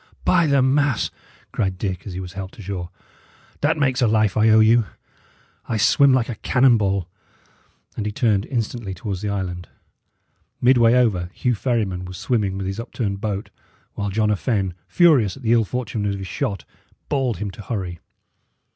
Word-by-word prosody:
"By 170 -3 +4
the 140 -2 +3
mass!" 140 -2 +1 0.4
cried 95 -4 -1
Dick, 95 -1 -4
as 95 - -6
he 90 - -5
was 90 -1 -7
helped 95 -1 -7
ashore, 95 -3 -5 0.7
"that 155 +2 +2
makes 135 -3 +1
a 120 - +4
life 110 -2 +2
I 110 +1 +4
owe 110 0 +6
you. 110 0 +4 0.8
I 110 - 0
swim 125 +6 +5
like 130 -3 +2
a 120 - -3
cannon 125 +3 +3
ball." 100 -3 0 0.9
And 105 - -3
he - - -2
turned 105 -3 +1
instantly 115 -5 -3
towards 95 0 -5
the 105 - -2
island. 90 -3 -4 0.9
Midway 120 -2 +5
over, 100 -9 +2
Hugh 125 - 0
Ferryman 105 -6 -1
was 90 0 -8
swimming 105 -2 -1
with 95 - -4
his 95 +3 -4
upturned 105 -4 -4
boat, 105 -1 -3 0.4
while 100 0 -3
John 105 +2 +1
a - - +3
Fenne, 100 -3 -1
furious 130 - +4
at 135 - -14
the 115 0 +3
ill 115 -2 +3
fortune 110 -3 -3
of 100 0 -1
his 95 - -6
shot, 100 +1 -3 0.4
bawled 135 -5 0
to 90 - -10
him 100 - -4
to 95 - -10
hurry. 95 -6 -4
105 Hz, 180 wpm, -22 LUFS, 95-120 Hz, 0.9 s, owe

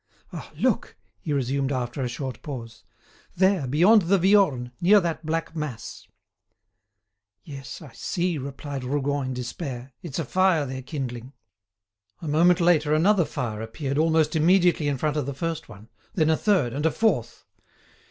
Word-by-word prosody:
"Ah! - - -8
look!" - - 0 0.2
he 150 - -5
resumed 135 0 0
after 125 0 -3
a 125 - -1
short 125 0 -5
pause. 115 -6 -8 0.5
"There, 190 -6 +2
beyond 180 - +5
the 190 +3 +2
Viorne, 175 -10 +3
near 200 +4 +6
that 170 -3 -3
black 165 +1 -3
mass." 125 -8 -6 1.4
"Yes, 140 +2 -9
I 135 -6 -13
see," 175 -3 -2
replied 140 0 -6
Rougon, 140 +1 -1
in 130 - -3
despair; 125 0 -6
"it's 160 -6 -6
a 165 - -2
fire 185 -1 +2
they're 130 0 -5
kindling." 130 -2 -6 0.9
A 165 - -7
moment 170 +4 +4
later 155 -3 +3
another 180 +2 +3
fire 110 -6 -4
appeared 135 +5 -3
almost 160 0 +2
immediately 175 -1 +3
in 140 -2 0
front 150 +3 -1
of 145 -3 -1
the 140 - -4
first 165 -1 -4
one, 105 0 -13 0.3
then 160 -3 +3
a - - +4
third, 175 - +1
and 145 +4 0
a - - +1
fourth. 190 - -1
150 Hz, 160 wpm, -25 LUFS, 130-170 Hz, 1.4 s, near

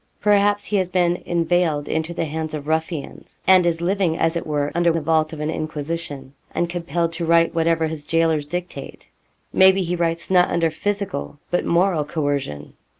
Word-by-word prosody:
Perhaps 205 0 +3
he 210 - 0
has 185 -2 0
been 175 -1 +2
inveigled 170 -3 +1
into 160 +1 -2
the 170 - -2
hands 155 0 -4
of 145 -1 -6
ruffians, 160 -1 -4
and 185 -2 +6
is 170 -1 0
living 180 -2 +1
as 165 +1 +1
it 170 - -3
were 145 -1 -1
under 170 0 +3
the 165 - 0
vault 155 0 +1
of 160 - -7
an 150 +1 -1
Inquisition, 150 -3 -5 0.2
and 175 - +1
compelled 170 -1 -2
to 170 +1 -4
write 165 0 +4
what 165 -1 +1
ever 165 -1 +2
his 155 -2 -4
gaolers 165 -3 +1
dictate. 175 +3 -6 0.4
Maybe 190 0 +5
he 175 0 -1
writes 170 +1 -1
not 180 -1 +5
under 165 -1 +1
physical 200 -4 -3
but 175 - +1
moral 170 -2 +2
coercion. 145 - -3
165 Hz, 185 wpm, -22 LUFS, 155-175 Hz, 0.4 s, and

